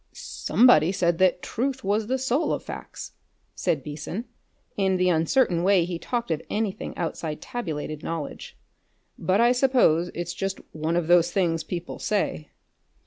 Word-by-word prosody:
"Somebody 205 -9 +3
said 175 -3 +1
that 185 -1 +3
truth 265 +2 -2
was 210 +2 0
the 260 +2 0
soul 265 +4 0
of - - -3
facts," - - -8 0.4
said 140 -4 -1
Beason, 155 - -5 0.5
in 190 -2 +1
the 180 0 +2
uncertain 170 +3 +2
way 185 -2 +4
he 175 -1 -4
talked 240 -2 -3
of 160 - -1
anything 210 -2 -3
outside 160 -2 -3
tabulated 155 -9 -5
knowledge. 165 -3 -6 0.6
"But 190 +2 +1
I 240 +1 +5
suppose 245 - +3
that's 175 0 -3
just 195 +1 -3
one 160 +2 -2
of 175 -1 +1
those 175 0 +5
things 170 -4 +1
people 175 -1 -6
say." 195 -7 -1
180 Hz, 150 wpm, -25 LUFS, 165-220 Hz, 0.6 s, I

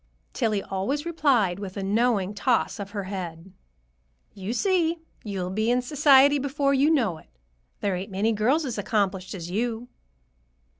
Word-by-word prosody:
Tillie 210 -3 0
always 260 - -2
replied 260 - +2
with 195 -2 -7
a 195 - -3
knowing 210 -1 +1
toss 235 +1 0
of 200 -1 -5
her 200 -1 -4
head, 185 -2 -7 0.8
"You 195 +2 -5
see! 340 - +1 0.3
You'll 190 -4 -4
be 220 +4 0
in 250 +1 +2
society 285 +1 +5
before 275 0 0
you 275 +3 +3
know 225 - +1
it. - - -21 0.5
There 200 -2 0
ain't 190 +4 -5
many 200 +4 0
girls 250 +9 +1
as 240 -5 -3
accomplished 195 -2 -1
as 175 -1 -7
you." 230 +3 -2
220 Hz, 155 wpm, -25 LUFS, 195-270 Hz, 0.8 s, society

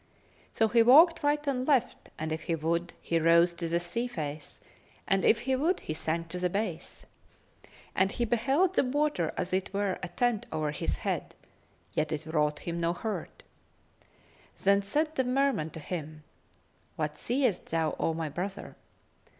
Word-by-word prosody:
So 225 - +2
he 230 +2 +4
walked 315 +9 +7
right 295 0 +1
and 260 -2 -1
left, 260 -5 +1
and 155 0 -4
if 160 0 -2
he 165 - 0
would, 170 +2 -1
he 165 - 0
rose 170 +2 +5
to 170 -1 -4
the 170 +1 +1
sea 230 +8 -2
face, 150 - -6 0.5
and 195 -1 +2
if 230 - +4
he 265 +1 0
would, 320 +8 +1
he 155 - -4
sank 165 +1 -2
to 180 - -4
the 180 0 +1
base. 205 +5 -4 0.9
And 190 +1 +3
he 240 - -1
beheld 270 - +2
the - - +3
water 275 - 0
as 185 - -3
it 185 0 -1
were 200 -2 0
a 180 - -3
tent 240 +3 0
over 155 -1 -1
his 150 - -2
head; - - -3 0.6
yet 155 +4 0
it 155 0 -3
wrought 150 -2 0
him 170 0 -3
no 170 +1 +1
hurt. 215 +5 -5 1.2
Then 200 +1 +4
said 300 +10 -1
the 265 - +1
Merman 255 - +1
to 160 - -8
him, 155 -1 -6 0.7
"What 150 -1 -2
seest 245 - 0
thou, 160 -1 0
O 165 - 0
my 165 -1 -2
brother?" 190 +6 -5
185 Hz, 175 wpm, -29 LUFS, 160-250 Hz, 1.2 s, walked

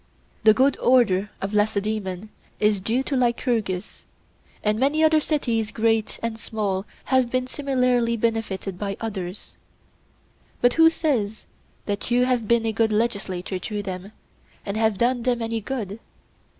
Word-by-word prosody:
The 215 -1 +7
good 270 +4 +3
order 210 -6 +3
of 195 +2 -3
Lacedaemon 210 -2 -1 0.3
is 210 -2 +2
due 235 +7 0
to 275 - -2
Lycurgus, 235 -6 -1 0.6
and 215 +1 +1
many 290 +4 +2
other 315 0 +5
cities 235 -8 0
great 225 0 0
and 230 -1 -3
small 205 -3 -2 0.2
have 260 -2 +2
been 255 +1 0
similarly 250 -4 +1
benefited 210 -5 -2
by 200 -1 -3
others; 195 -4 -6 1.0
but 245 0 +4
who 325 0 +7
says 240 -11 -1 0.4
that 205 +2 -3
you 245 +1 +3
have 245 -4 0
been 235 0 +3
a 225 - +1
good 220 +1 +2
legislator 200 -4 -1
to 205 +2 -4
them 190 +1 -6 0.5
and 200 - -3
have 220 -2 +1
done 245 +3 +1
them 245 0 +1
any 225 -1 -2
good? 220 -3 -4
225 Hz, 145 wpm, -24 LUFS, 205-245 Hz, 1.0 s, The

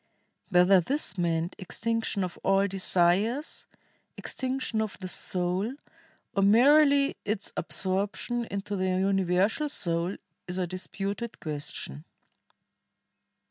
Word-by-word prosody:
WTiether 180 0 +5
this 275 - +1
meant 170 -1 -1
extinction 225 +1 -1
of 180 -1 -4
all 195 +1 +3
desires, 195 - +1 0.5
extinction 260 -4 -2
of 215 -2 -4
the 185 - -6
soul, 185 +6 -1 0.6
or 200 - +2
merely 280 +7 +5
its 210 -1 -2
absorption 200 +7 -1
into 200 0 -4
the 185 -1 0
universal 190 - +1
soul 170 -5 -1 0.3
is 180 +1 -4
a 185 - 0
disputed 195 +5 -5
question. 145 - -4
195 Hz, 100 wpm, -28 LUFS, 180-225 Hz, 0.6 s, WTiether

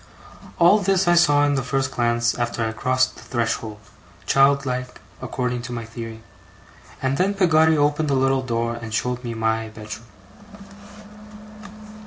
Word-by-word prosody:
All 175 +5 +5
this 195 -1 +1
I 175 - +5
saw 145 -4 +4
in 145 - +1
the 135 - 0
first 135 +1 -1
glance 120 -1 +1
after 120 -1 -2
I 110 - -2
crossed 130 +2 0
the - - -12
threshold 115 -3 -3 0.5
child 140 0 +3
like, 125 -1 -4 0.2
according 125 -1 -3
to - - -6
my 115 -1 -5
theory 115 0 -8 0.8
and 135 +1 0
then 195 +2 +1
Peggotty 160 -4 +4
opened 145 +1 +1
a 140 - +2
little 135 0 +2
door 115 -2 -2
and 115 -1 -8
showed 125 +3 -2
me 120 -1 -5
my 110 0 -1
bedroom. 110 +1 -9
125 Hz, 155 wpm, -22 LUFS, 115-145 Hz, 0.8 s, All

